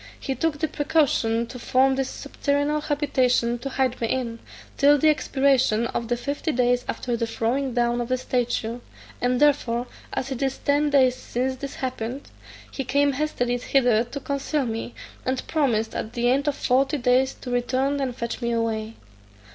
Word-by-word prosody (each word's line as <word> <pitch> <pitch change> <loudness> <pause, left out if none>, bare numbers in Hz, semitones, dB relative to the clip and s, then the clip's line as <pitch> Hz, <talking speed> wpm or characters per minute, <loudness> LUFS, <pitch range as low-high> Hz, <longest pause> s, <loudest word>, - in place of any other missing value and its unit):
He 270 - -2
took 320 +2 -1
the 315 - 0
precaution 275 -7 +1
to 250 +2 -9
form 265 +3 +3
this 270 -1 -1
subterranean 285 +1 -1
habitation 255 -5 +1
to 275 - -4
hide 260 -2 -1
me 230 - +1
in, 235 -2 -2 0.4
till 290 +1 +5
the 310 +3 +4
expiration 265 -6 +2
of 235 0 -3
the 240 +1 0
fifty 285 +5 -2
days 245 -1 +2
after 245 -1 -2
the 230 0 -1
throwing 245 +3 -1
down 240 0 +1
of 240 - -3
the 255 - +2
statue; 245 -2 -1 0.4
and 245 0 +1
therefore, 250 -5 +2 0.3
as 270 - -3
it 265 - -4
is 270 -1 0
ten 290 +1 +1
days 265 -3 +4
since 255 +1 -2
this 275 +1 -6
happened, 255 0 -5 0.4
he 270 - -3
came 280 +2 +2
hastily 255 -4 -1
hither 245 -3 +3
to 260 +4 -6
conceal 280 +1 -1
me, 225 +1 -4 0.3
and 260 0 -2
promised 235 -8 0
at 220 - -4
the 240 0 +2
end 280 +3 +1
of 290 - +1
forty 270 +3 +2
days 255 +1 +2
to 250 - -8
return 260 +3 0
and 260 -3 -2
fetch 235 +1 -4
me 235 0 0
away. 225 -1 -2
255 Hz, 180 wpm, -24 LUFS, 240-280 Hz, 0.4 s, till